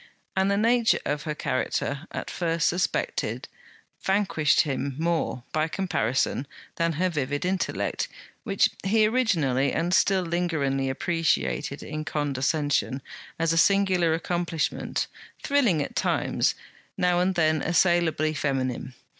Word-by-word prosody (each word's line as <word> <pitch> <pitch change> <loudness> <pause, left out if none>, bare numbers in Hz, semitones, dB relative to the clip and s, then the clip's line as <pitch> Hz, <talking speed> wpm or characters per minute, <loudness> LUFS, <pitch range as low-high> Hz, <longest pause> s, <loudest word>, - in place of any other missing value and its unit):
And 190 0 +2
the 200 - +2
nature 230 +1 +3
of 145 +1 -2
her 150 -1 -2
character, 140 +3 -2
at - - -5
first 165 -2 0
suspected, 180 +2 -1 0.5
vanquished 190 -7 +2
him 140 -2 -2
more, 165 -6 -1
by 155 0 +1
comparison, 140 - -1 0.3
than 165 0 +1
her 180 +5 +1
vivid 145 -2 -2
intellect, 185 +1 -1 0.4
which 220 0 +2
he 215 +3 +3
originally, 165 - +1
and 175 +2 0
still 190 -1 +3
lingeringly, 155 -6 0
appreciated 165 -1 -1
in 155 0 -5
condescension, 145 -2 0 0.3
as 165 0 +1
a - - 0
singular 185 -4 +3
accomplishment, 170 -1 -2 0.4
thrilling 240 - +2
at - - -8
times, - - +1 0.4
now 180 -1 +2
and 185 +1 +1
then 155 -2 +2
assailably 170 -3 +2
feminine. 130 -3 -2
165 Hz, 120 wpm, -26 LUFS, 145-185 Hz, 0.5 s, nature